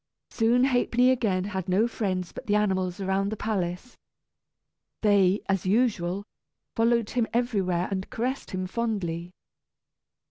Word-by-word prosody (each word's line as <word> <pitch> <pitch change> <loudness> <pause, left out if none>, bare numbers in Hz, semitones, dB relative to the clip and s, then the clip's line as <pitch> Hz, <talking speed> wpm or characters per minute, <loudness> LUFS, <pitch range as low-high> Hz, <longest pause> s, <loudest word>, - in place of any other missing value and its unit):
Soon 240 +2 +3
Ha'penny 250 -1 +3
again 210 -8 +1
had 190 -2 -4
no 200 +6 +3
friends 185 -6 -2
but - - -10
the 205 - +2
animals 190 -3 0
around 195 +1 0
the 220 - -4
palace. 195 +1 -3 1.0
They, 200 -2 +4
as 195 -1 0
usual, 200 -4 +1 0.5
followed 230 -1 +2
him 240 -2 +1
everywhere, 195 -8 0
and 190 -1 -3
caressed 255 +4 -3
him 185 0 -3
fondly. 185 -5 -2
200 Hz, 130 wpm, -27 LUFS, 185-235 Hz, 1.0 s, They